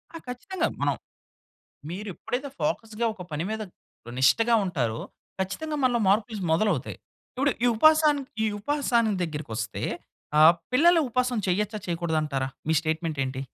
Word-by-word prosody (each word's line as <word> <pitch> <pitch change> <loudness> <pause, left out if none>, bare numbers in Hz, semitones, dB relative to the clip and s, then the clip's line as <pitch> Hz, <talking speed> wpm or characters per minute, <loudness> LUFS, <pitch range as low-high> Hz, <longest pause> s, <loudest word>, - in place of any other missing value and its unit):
ఆ! - - -3
ఖచ్చితంగా. 305 +10 -2
మనం - - +2 1.0
మీరు 200 +5 -5
ఎప్పుడైతే 265 - -4
ఫోకస్‌గా 230 -7 -1
ఒక 190 - -8
పని 150 +2 -2
మీద 220 0 -3 0.6
నిష్టగా 225 - +4
ఉంటారో, 125 -11 -1 0.4
ఖచ్చితంగా 300 +12 -3
మనలో 245 -2 +3
మార్పులు 215 +3 +2
ఇస్ 195 - -4
మొదలవుతాయి. 165 - 0 0.3
ఇప్పుడు 280 +3 +1
ఈ - - +5
ఉపాసానికి 305 0 +4 0.2
ఈ - - +2
ఉపాసాని 235 -3 +1
దగ్గరకొస్తే 120 -9 -4 0.6
ఆహ్, 160 +2 +9 0.2
పిల్లలు 335 +6 +5
ఉపవాసం 250 0 0
చెయ్యొచ్చా, 210 +3 0
చేయకూడదంటారా? 155 -6 -1 0.2
మీ - - +4
స్టేట్‌మెంట్ 160 -1 -2
ఏంటి? 130 0 -4
210 Hz, 135 wpm, -26 LUFS, 160-250 Hz, 1.0 s, ఆహ్